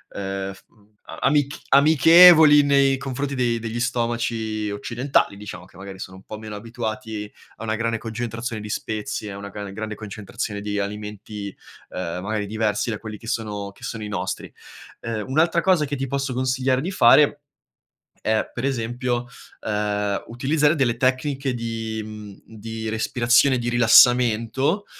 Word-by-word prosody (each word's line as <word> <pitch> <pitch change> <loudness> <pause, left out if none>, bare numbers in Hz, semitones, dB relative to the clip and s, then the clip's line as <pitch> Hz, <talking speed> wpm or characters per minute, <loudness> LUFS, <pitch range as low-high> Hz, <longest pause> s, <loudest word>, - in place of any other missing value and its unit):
uhm, 95 0 -4
f - - -18
mhmm 105 -1 -28
a - - -8
amic 145 0 +2
amichevoli 160 +1 +8
nei 140 -1 +3
confronti 140 +1 -3
dei 120 -3 0
degli 115 +1 -4
stomaci 115 -3 -1
occidentali, 115 +2 0
diciamo, 100 -3 -9
che 95 - -22
magari 95 +1 -9
sono 95 0 -8
un - - -14
po' 110 - -8
meno 110 -1 -8
abituati 110 -1 -5 0.2
a - - -10
una 110 -1 -1
grande 115 +1 -1
concentrazione 115 0 -5
di 105 - -8
spezie, 105 0 -4
a 100 - -7
una 100 0 -7
gra 100 -1 -7
grande 110 +1 -5
concentrazione 105 0 -6
di 105 0 -3
alimenti, 105 0 -5 0.4
uhm, 90 -1 -4
magari 105 +1 -2
diversi 110 +2 -1
da 105 - -4
quelli 110 -2 -7
che 115 - -15
sono 105 -4 -3
che 100 - -23
sono 115 -3 -5
i - - -5
nostri. 105 - -4 0.5
Uhm, 115 -2 -3
un'altra 165 +5 +2
cosa 175 -4 +3
che 145 - -3
ti 135 0 -3
posso 135 0 -2
consigliare 130 0 +1
di 175 +6 -3
fare 145 -2 +5 0.8
è 110 0 +1
per 120 - -5
esempio, 120 -1 -2 0.4
uhm, 105 -1 -1
utilizzare 145 +6 +1
delle 125 -6 0
tecniche 130 +1 0
di, 115 -2 -4
mhmm, 105 -2 -9 0.2
di 110 +1 -5
respirazione, 120 +4 +3
di 120 0 -2
rilassamento, 120 - +4
115 Hz, 160 wpm, -23 LUFS, 105-130 Hz, 0.8 s, amichevoli